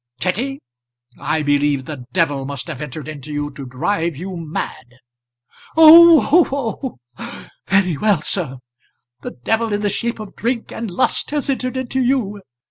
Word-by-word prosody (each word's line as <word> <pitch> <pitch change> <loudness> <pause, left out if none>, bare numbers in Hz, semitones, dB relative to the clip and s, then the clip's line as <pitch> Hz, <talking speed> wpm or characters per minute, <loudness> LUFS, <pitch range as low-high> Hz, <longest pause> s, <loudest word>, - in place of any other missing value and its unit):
"Kitty, 235 - -2 0.6
I 155 0 -1
believe 145 -2 +1
the 140 -4 -8
devil 145 -6 0
must 140 -1 -5
have 130 - -7
entered 150 0 -7
into 150 -1 -8
you 145 0 -3
to 140 -1 -9
drive 165 +6 -1
you 185 +3 -6
mad." 155 -6 -6 0.8
"Oh, 330 0 +8
oh, 265 - -4 0.2
oh! - - -8 0.2
very 190 -5 +2
well, 200 -3 +1
sir. 150 -9 0 0.6
The - - -8
devil 225 - 0
in 205 0 -1
the 205 - +1
shape 230 +3 -2
of 215 -2 -9
drink 235 0 -2
and 225 -2 -5
lust 185 +8 0
has 290 -1 -1
entered 255 -1 -2
into 260 0 -2
you. 240 -6 0
190 Hz, 155 wpm, -19 LUFS, 145-245 Hz, 0.8 s, Oh